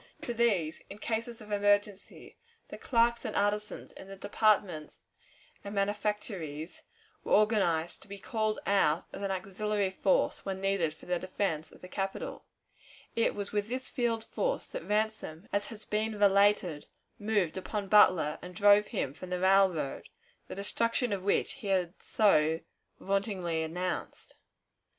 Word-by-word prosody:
To 240 - -3
these, 200 -9 +1
in - - -8
cases 230 +1 -3
of 210 0 -11
emergency, 205 -1 0 0.3
the - - -7
clerks 235 -1 +2
and 220 -4 -4
artisans 210 +1 -1
in 190 - -12
the 195 - -8
departments 200 -5 +1 0.6
and 200 +1 -6
manufactories, 200 -6 -2 0.4
were - - -1
organized, 195 -7 +2
to - - -14
be 200 0 -8
called 215 +1 -1
out 180 -5 +2
as - - -7
an 200 - -1
auxiliary 195 +1 -1
force 190 0 +1
when 190 -1 -3
needed 195 -5 0
for - - -16
the 180 -1 0
defense 175 -4 -2
of - - -17
the 180 - -9
capital 195 +1 -4 0.7
It 230 - +2
was 200 -1 -4
with 205 0 -1
this 255 +1 -3
field 235 -4 -1
force - - -2
that - - -6
Ransom, 210 -6 -1
as 205 0 +1
has 215 -2 -9
been 215 0 -1
related, 200 -5 +3 0.3
moved 205 -6 0
upon 200 +2 -3
Butler, 185 -7 +5
and 180 0 -9
drove 205 0 +6
him 190 - -2
from 185 +4 -9
the 180 0 -2
railroad, 190 -6 +2 0.4
the - - -7
destruction 230 +3 0
of 195 - -2
which 200 +2 +1
he 210 - -5
had 185 -2 0
so 160 -7 +3 0.4
vauntingly 195 -4 -1
announced. 180 +3 -4
200 Hz, 150 wpm, -30 LUFS, 180-215 Hz, 0.7 s, drove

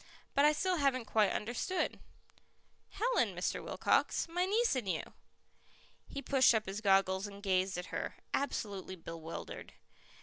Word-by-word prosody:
"But 280 +1 +5
I 300 - +7
still 360 +4 0
haven't 270 -5 +1
quite 215 -2 +3
understood." 240 - -2 0.9
"Helen, 480 +5 +1
Mr. - - -2
Wilcox - - +1
my 355 +2 0
niece 450 - +2
and 235 -7 -2
you." 165 - -3 0.9
He 280 - -6
pushed 260 -4 +5
up 220 - +1
his 195 +2 -4
goggles 195 -1 +3
and 200 0 -11
gazed 185 -1 +1
at 180 - -6
her, - - -3 0.2
absolutely 200 -9 -2
bewildered. 165 -1 -8
220 Hz, 140 wpm, -34 LUFS, 190-290 Hz, 0.9 s, I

